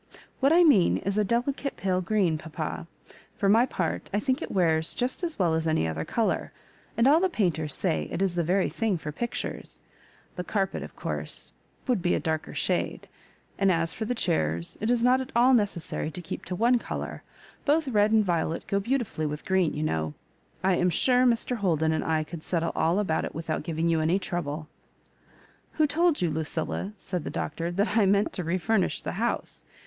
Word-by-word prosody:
What 275 +2 +4
I 345 +2 +6
mean 230 - +5
is 200 +2 -1
a - - +4
delicate 250 +6 -1
pale 185 -1 0
green, 185 -3 +1
papa. 160 +1 -5 0.5
For 200 - 0
my 225 +5 +5
X>art, 180 -10 -3
I 205 - +1
think 260 +3 0
it - - -4
wears 160 -4 +1
just 255 +8 -1
as 335 -2 -1
well 175 -4 +2
as 160 0 0
any 155 - +1
other 80 0 -3
colour; 230 -2 -1 0.5
and 230 - +4
all 300 +4 +6
the 375 +1 +2
painters 160 - 0
say 75 -1 -1
it - - -3
is 190 -2 +1
the 175 - 0
very 185 +4 +2
thing 220 -5 -1
for 150 -2 -6
pictures. 235 +10 -5 0.6
The 180 - -2
carpet, 195 0 -1
of - - -9
course, - - -4 0.4
would 245 -7 +1
be 175 0 +2
a - - 0
darker 160 -1 -3
shade; - - -1 0.5
and 195 -1 +4
as 165 -1 +1
for 220 - -4
the 245 +3 -1
chairs, 85 - 0
it 215 - 0
is 240 -1 +2
not 255 +1 +4
at 260 - -7
all 250 +2 +5
necessary 200 -9 0
to 180 - -6
keep - - -6
to 180 - -4
one 240 +5 +3
colour. - - -5 0.4
Both 300 +1 +2
red 210 -4 +3
and 220 -1 +4
violet 165 -2 -1
go 200 - 0
beautifully 220 - -1
with 150 0 -5
green, 190 -4 +2
you 150 - -2
know. 80 - -1 0.5
I 185 -1 +3
afls 180 -1 +2
sure, 250 +7 +4
Mr. 240 +1 +1
Holden 160 -6 +1
and 160 - 0
I 160 -1 +1
could 165 +1 -8
settle 165 0 -1
all 165 +3 +2
about 190 -6 0
it - - -5
without 160 0 -2
giving 165 0 -1
you 165 -1 +2
any 165 +4 +2
trouble." 155 -5 -4 1.1
"Who 310 - +3
told 320 - +2
you, 170 - +1
Lucilla," 160 +5 -3
said 180 -4 -4
the - - -4
Doctor, 165 +3 -3
"that 200 +5 0
I 215 -4 +4
meant 200 +1 +2
to 180 - -3
refurnish 185 +5 0
the - - -3
house?" 235 - -2
185 Hz, 205 wpm, -27 LUFS, 160-230 Hz, 1.1 s, I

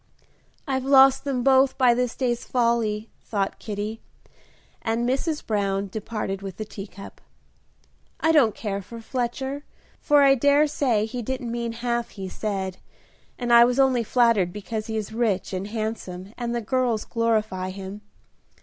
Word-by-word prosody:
"I've 265 -1 -1
lost 270 0 +6
them 260 -3 -1
both 265 0 +4
by 250 -3 +5
this 245 -1 -1
day's 240 -2 -1
folly," 230 -3 0
thought 200 -3 -2
Kitty, 210 +1 -5 0.8
as 225 0 -1
Mrs. 265 +6 -1
Brown 200 -2 -1
departed 210 -2 -4
with 195 -2 -7
the 215 - -4
teacup. 200 -1 -10 1.0
"I 320 - +3
don't 270 -9 +4
care 200 -2 -3
for 230 +4 -10
Fletcher, 265 +4 -3 0.4
for 290 -2 +4
I 275 -1 +7
dare 285 +3 +4
say 250 -7 +1
he 245 +2 -5
didn't 245 0 -4
mean 235 -1 -3
half 235 0 -2
he 195 -2 -7
said, 190 -2 -3 0.6
and 240 -1 0
I 235 0 +9
was 245 +2 +2
only 260 -3 +4
flattered 230 -6 +3
because 215 +2 -5
he 220 -1 -2
is 215 0 -4
rich 215 -6 0
and 190 +1 -3
handsome 210 -3 -5
and 240 -1 -3
the 235 - -1
girls 240 -1 0
glorify 215 -5 0
him. 195 +2 -7
230 Hz, 155 wpm, -24 LUFS, 210-250 Hz, 1.0 s, I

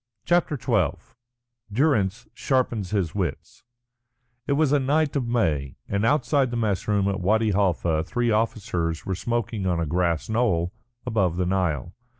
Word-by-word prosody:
CHAPTER 175 -4 +2
XII 115 - +1 0.8
DURRANCE 110 -6 +1
SHARPENS 120 -7 0
HIS 95 -7 -1
WITS 90 -8 -4 0.8
It 140 - +2
was 150 -1 +2
a 145 - +4
night 145 +3 +1
of 130 -4 0
May, 75 - 0
and 100 +1 -1
outside 135 +1 +2
the 120 - -3
mess 105 -5 -1
room 100 -2 +2
at 100 -1 -1
Wadi 110 +3 +2
Halfa 85 -5 +1
three 120 +7 0
officers 100 -7 -1
were 95 - -1
smoking 110 0 -2
on 90 -2 +1
a 85 - 0
grass 85 0 0
knoll 105 -7 +1 0.3
above 100 -8 +1
the 90 - +1
Nile. 90 -4 -1
105 Hz, 155 wpm, -25 LUFS, 90-120 Hz, 0.8 s, a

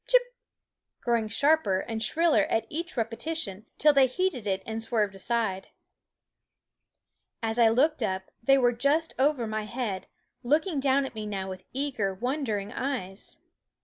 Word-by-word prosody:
Chip! - - +3 0.7
growing 235 -2 +1
sharper 255 -4 +2
and 225 -1 -4
shriller 305 -2 +3
at 225 0 0
each 335 0 -5
repetition, 230 -2 -3
till 300 0 +5
they 270 -2 +6
heeded 260 - -1
it 190 -1 -1
and 225 0 -4
swerved 215 -3 0
aside. 195 -1 -1 1.8
As 225 +1 -1
I 230 -1 +7
looked 275 +6 +2
up 190 -3 -2
they 270 +4 +5
were 245 -2 +4
just 285 +7 +1
over 270 -3 +2
my 215 -1 -3
head, 215 -5 -3 0.3
looking 300 +5 +1
down 275 0 +2
at 265 - -7
me 215 -1 -5
now 195 -2 -3
with 185 0 -9
eager, 250 -8 -1
wondering 230 -3 -2
eyes. 230 -8 -4
235 Hz, 145 wpm, -28 LUFS, 210-280 Hz, 1.8 s, I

